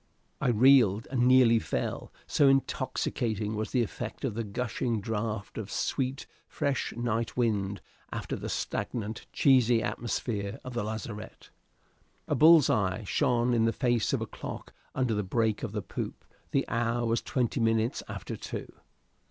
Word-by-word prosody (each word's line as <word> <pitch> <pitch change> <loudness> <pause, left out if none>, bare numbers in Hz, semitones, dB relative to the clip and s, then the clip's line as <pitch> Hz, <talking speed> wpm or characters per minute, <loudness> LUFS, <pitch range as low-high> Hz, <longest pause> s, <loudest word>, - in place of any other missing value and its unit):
I 135 - +1
reeled 120 -3 +5
and 125 -2 +2
nearly 125 -3 +6
fell, - - -3
so 145 - +3
intoxicating 110 -5 0
was 105 0 -2
the 125 - +2
effect 115 +3 -5
of 125 - -1
the 115 +2 -2
gushing 115 +2 -2
draught 105 0 -3
of 105 -2 -6
sweet, 135 0 -1 0.2
fresh 140 -2 -1
night 115 0 -2
wind 100 -5 0 0.3
after - - -4
the - - -5
stagnant, 110 -2 -3
cheesy 125 -4 +4
atmosphere 105 -3 -3
of 125 - -7
the 120 - -1
lazarette. 110 0 -7 0.8
A - - 0
bull's 160 -2 +7
eye 100 +1 +1
shone 120 +4 +2
on 115 -1 +3
the 115 - +3
face 120 -1 +1
of - - 0
a - - -1
clock - - -8 0.2
under 130 -3 +1
the 105 - 0
break 110 +2 0
of 115 - -4
the 105 -2 -3
poop; - - -6 0.2
the 135 - 0
hour 120 0 0
was 115 +1 +1
twenty 125 0 -1
minutes 115 +1 +1
after - - -5
two. - - -7
115 Hz, 155 wpm, -29 LUFS, 110-125 Hz, 0.8 s, bull's